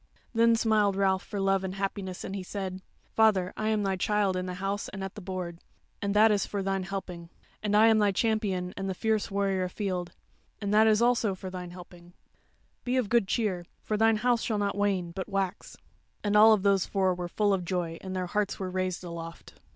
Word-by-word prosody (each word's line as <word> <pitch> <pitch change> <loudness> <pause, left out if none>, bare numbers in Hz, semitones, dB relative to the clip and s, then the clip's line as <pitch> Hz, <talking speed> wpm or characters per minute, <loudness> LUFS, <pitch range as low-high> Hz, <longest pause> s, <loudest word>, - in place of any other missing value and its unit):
Then 230 0 +4
smiled 215 -3 +2
Ralph 190 -1 +2
for 205 - -6
love 195 0 +2
and 190 0 -4
happiness, 195 -1 -4
and 195 - -5
he 195 - -3
said: 190 0 -5 0.3
"Father, 205 -5 +3
I 215 - -2
am 215 -1 +1
thy 195 -1 0
child 205 0 +1
in 185 0 -2
the 180 - -4
house 195 +2 -3
and 195 -1 -6
at 195 - -5
the 210 - -9
board, 180 -2 -5 0.4
and 200 0 -1
that 215 +1 +6
is 205 -2 +2
for 200 -1 -3
thine 195 0 -1
helping. 185 -3 -6 0.3
And 210 -1 +1
I 220 - +7
am 220 -1 +5
thy 205 -1 +3
champion 195 -4 0
and 195 0 -3
the 190 - -2
fierce 220 +1 0
warrior 195 -2 0
afield, 180 -2 -3 0.5
and 200 0 -2
that 215 +1 +6 0.2
also 235 -4 +2
is - - -10
for 185 - -6
thine 180 -1 -6
helping. 175 0 -13 0.7
Be 255 +1 0
of 240 -6 0
good 235 -4 +3
cheer; 190 -6 -1 0.2
for 215 - -1
thine 225 +1 +4
house 240 +1 +2
shall 220 - -1
not 200 -1 -1
wane, 195 -4 0
but 190 +3 -6
wax." 195 -1 -3 0.5
And 205 0 0
all 215 +1 +8
those 195 -1 +2
four 190 -2 +1
were 175 0 -4
full 205 +3 +1
of 185 -2 -1
joy 170 -2 -3
and 190 0 -6
their 185 -1 -1
hearts 205 +2 -1
were 185 -2 -3
raised 185 -1 -2
aloft. 170 -1 -8
195 Hz, 215 wpm, -28 LUFS, 185-210 Hz, 0.7 s, all